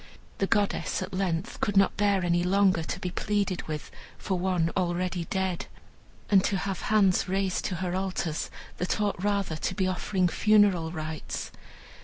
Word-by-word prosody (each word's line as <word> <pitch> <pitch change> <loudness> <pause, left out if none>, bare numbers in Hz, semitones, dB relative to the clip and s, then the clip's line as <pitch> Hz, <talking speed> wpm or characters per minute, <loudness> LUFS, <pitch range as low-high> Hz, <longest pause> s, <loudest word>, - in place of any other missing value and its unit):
The 195 - +1
goddess, 205 -1 0
at 190 +1 -8
length, 185 +1 -2
could 205 -2 +1
not 195 -1 +4
bear 200 -3 +2
any 175 0 +2
longer 190 -1 +3
to 160 - -4
be 180 - -3
pleaded 200 -1 -1
with 155 -1 -5 0.3
for 190 -2 -2
one 175 -3 +1
already 180 -1 -1
dead, 190 -1 -2 0.6
and 195 -2 +5
to 200 - +1
have 195 0 -3
hands 195 -4 +4
raised 190 -1 0
to 185 - -1
her 180 0 -2
altars 185 -4 -2 0.3
that 180 - -1
ought 205 -3 -1
rather 200 -6 0
to 185 - -2
be 190 - +1
offering 185 0 0
funeral 200 -4 +3
rites. 155 -2 -5
185 Hz, 165 wpm, -28 LUFS, 175-195 Hz, 0.6 s, and